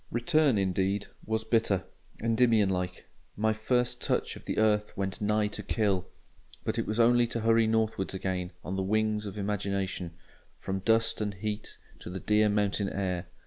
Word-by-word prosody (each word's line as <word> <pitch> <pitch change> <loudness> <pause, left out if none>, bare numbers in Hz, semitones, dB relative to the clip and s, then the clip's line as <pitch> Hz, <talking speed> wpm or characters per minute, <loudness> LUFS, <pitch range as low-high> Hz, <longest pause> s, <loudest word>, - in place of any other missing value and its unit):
Return, 140 +1 +3
indeed, 95 +1 0 0.2
was 110 0 0
bitter; 110 -4 +1 0.4
Endymion 115 -3 +3
like, 90 -1 -3 0.3
"my 110 +1 +2
first 125 +3 0
touch - - 0
of - - -12
the - - -3
earth 105 -1 +2
went 95 -1 -3
nigh 105 +1 +2
to 105 - -5
kill": 100 -3 0 0.6
but - - -1
it - - -2
was 110 +2 -2
only 120 +1 +5
to 115 0 -2
hurry 115 0 +4
northwards 110 -4 0
again 90 -1 -2
on 95 - -4
the 95 - -1
wings 105 +1 0
of 100 - -7
imagination, 100 -3 -2 0.4
from 95 0 -3
dust 115 +3 +2
and 105 -2 -2
heat 105 +2 -5 0.2
to - - -8
the 95 +1 -5
dear 105 +1 +3
mountain 100 -1 +1
air. 90 -3 -2
105 Hz, 170 wpm, -29 LUFS, 95-110 Hz, 0.6 s, only